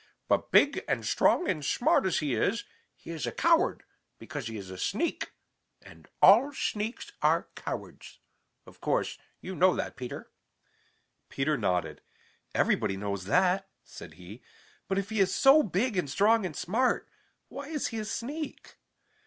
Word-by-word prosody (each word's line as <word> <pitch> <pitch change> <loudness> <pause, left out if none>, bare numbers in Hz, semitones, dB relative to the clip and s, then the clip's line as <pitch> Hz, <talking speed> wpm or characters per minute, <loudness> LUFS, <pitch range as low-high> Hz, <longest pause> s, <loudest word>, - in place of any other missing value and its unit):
But - - +1
big - - +4
and - - -1
strong 355 - +2
and 155 -5 -1
smart 190 - +2
as 180 - 0
he 145 -4 -1
is, 225 - 0 0.3
he - - -10
is 160 -2 -4
a - - -2
coward 335 +2 +2 0.3
because 145 -6 -6
he 110 -1 -6
is 95 -2 -8
a 95 - -8
sneak, 315 - -2 0.5
and - - -16 0.2
all 250 +8 +7
sneaks 220 -3 -3
are - - +2
cowards. - - -7 0.5
Of - - -17
course, - - -1 0.2
you 190 - -6
know 185 +1 +4
that, - - -4
Peter." 125 -1 -7 1.0
Peter 150 +3 0
nodded. 90 -9 -1 0.5
"Everybody 95 - +1
knows 100 -2 -4
that," 185 - +2
said 80 - -12
he. 90 +7 -12 0.5
"But 195 - -1
if 200 +2 -2
he 220 - -1
is 190 -1 +2
so 275 +3 +7
big 215 - -1
and 175 -6 -1
strong 210 +6 +3
and 155 - -9
smart, 230 +8 0 0.4
why 280 - -8
is 305 -2 -2
he 225 - -4
a 215 - -4
sneak?" 280 +7 -6
190 Hz, 160 wpm, -29 LUFS, 140-230 Hz, 1.0 s, all